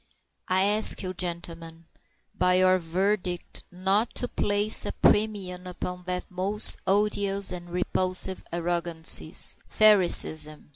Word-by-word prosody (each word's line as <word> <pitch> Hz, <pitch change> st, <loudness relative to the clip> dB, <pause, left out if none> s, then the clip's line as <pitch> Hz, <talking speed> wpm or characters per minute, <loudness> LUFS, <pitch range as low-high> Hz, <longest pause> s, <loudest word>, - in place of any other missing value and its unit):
I 185 Hz, +1 st, +3 dB
ask 210 Hz, +1 st, +4 dB
you, 185 Hz, 0 st, -5 dB
gentlemen, 170 Hz, -2 st, -6 dB, 0.5 s
by 180 Hz, 0 st, +1 dB
your 185 Hz, 0 st, +3 dB
verdict 180 Hz, +1 st, -3 dB
not 190 Hz, +5 st, 0 dB
to 245 Hz, -, -4 dB
place 205 Hz, -1 st, +1 dB
a -, -, -4 dB
premium 195 Hz, -4 st, -1 dB
upon 180 Hz, 0 st, -7 dB
that 180 Hz, 0 st, -4 dB
most 195 Hz, +3 st, +1 dB
odious 200 Hz, 0 st, 0 dB
of 175 Hz, -1 st, -8 dB
all -, -, -15 dB
repulsive 185 Hz, +1 st, -1 dB
arrogancies 170 Hz, -1 st, 0 dB
Phariseeism. 170 Hz, -8 st, +3 dB
185 Hz, 115 wpm, -25 LUFS, 175-200 Hz, 0.5 s, ask